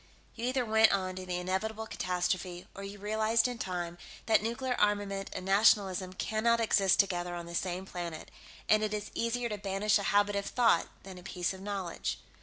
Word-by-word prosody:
You 235 Hz, -, -5 dB
either 255 Hz, 0 st, 0 dB
went 220 Hz, 0 st, +5 dB
on 185 Hz, -2 st, -1 dB
to 185 Hz, 0 st, -6 dB
the 180 Hz, -1 st, -1 dB
inevitable 210 Hz, +5 st, -2 dB
catastrophe, 180 Hz, -2 st, -2 dB
or 195 Hz, -, -8 dB
you 200 Hz, +1 st, -7 dB
realized, 220 Hz, +3 st, +2 dB
in 245 Hz, -2 st, -5 dB
time, 175 Hz, -2 st, -4 dB, 0.3 s
that 220 Hz, -2 st, +4 dB
nuclear 235 Hz, +3 st, -1 dB
armament 205 Hz, -1 st, 0 dB
and 185 Hz, -, -6 dB
nationalism 195 Hz, -2 st, +3 dB
cannot 225 Hz, +4 st, +1 dB
exist 200 Hz, -4 st, +3 dB
together 175 Hz, -3 st, +1 dB
on 170 Hz, -1 st, -6 dB
the 170 Hz, -, -9 dB
same 180 Hz, +1 st, -2 dB
planet, 170 Hz, -4 st, -6 dB, 0.4 s
and 215 Hz, 0 st, +4 dB
it 215 Hz, 0 st, 0 dB
is 210 Hz, 0 st, -5 dB
easier 235 Hz, +1 st, -1 dB
to 210 Hz, -2 st, -4 dB
banish 200 Hz, +2 st, +1 dB
a -, -, -3 dB
habit 205 Hz, 0 st, +3 dB
of 200 Hz, 0 st, -2 dB
thought 240 Hz, -2 st, +3 dB, 0.2 s
than 190 Hz, -1 st, -9 dB
a -, -, -14 dB
piece 180 Hz, -1 st, -2 dB
of 190 Hz, -, -10 dB
knowledge. 195 Hz, -4 st, -3 dB
200 Hz, 195 wpm, -31 LUFS, 185-220 Hz, 0.4 s, went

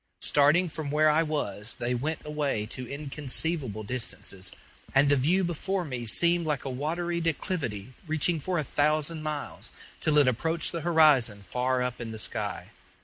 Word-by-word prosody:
Starting 150 Hz, +6 st, +4 dB
from 155 Hz, -2 st, -5 dB
where 155 Hz, +1 st, +4 dB
I 155 Hz, +2 st, +3 dB
was, 115 Hz, -9 st, -2 dB
they 120 Hz, +1 st, -1 dB
went 150 Hz, +7 st, -2 dB
away 145 Hz, -8 st, -1 dB
to 125 Hz, +2 st, -7 dB
inconceivable 140 Hz, -, -1 dB
distances, 100 Hz, -5 st, -3 dB, 0.4 s
and 140 Hz, +1 st, +5 dB
the 145 Hz, -, +5 dB
view 165 Hz, +8 st, +2 dB
before 180 Hz, +2 st, -2 dB
me 125 Hz, -5 st, -4 dB
seemed 170 Hz, +8 st, +4 dB
like 145 Hz, -4 st, -1 dB
a 135 Hz, -, -3 dB
watery 170 Hz, +6 st, -2 dB
declivity 140 Hz, -, -2 dB
reaching 160 Hz, +2 st, +1 dB
for 180 Hz, +4 st, -2 dB
a 155 Hz, -, +1 dB
thousand 150 Hz, +3 st, 0 dB
miles, 155 Hz, -1 st, -5 dB, 0.3 s
till 155 Hz, -1 st, +2 dB
it 145 Hz, -3 st, +6 dB
approached 160 Hz, +7 st, 0 dB
the 170 Hz, -, -3 dB
horizon 145 Hz, -11 st, +4 dB
far 125 Hz, +5 st, 0 dB
up 125 Hz, -1 st, -3 dB
in 115 Hz, -1 st, -5 dB
the 110 Hz, -, -6 dB
sky. 95 Hz, -4 st, -3 dB
145 Hz, 165 wpm, -28 LUFS, 125-160 Hz, 0.4 s, it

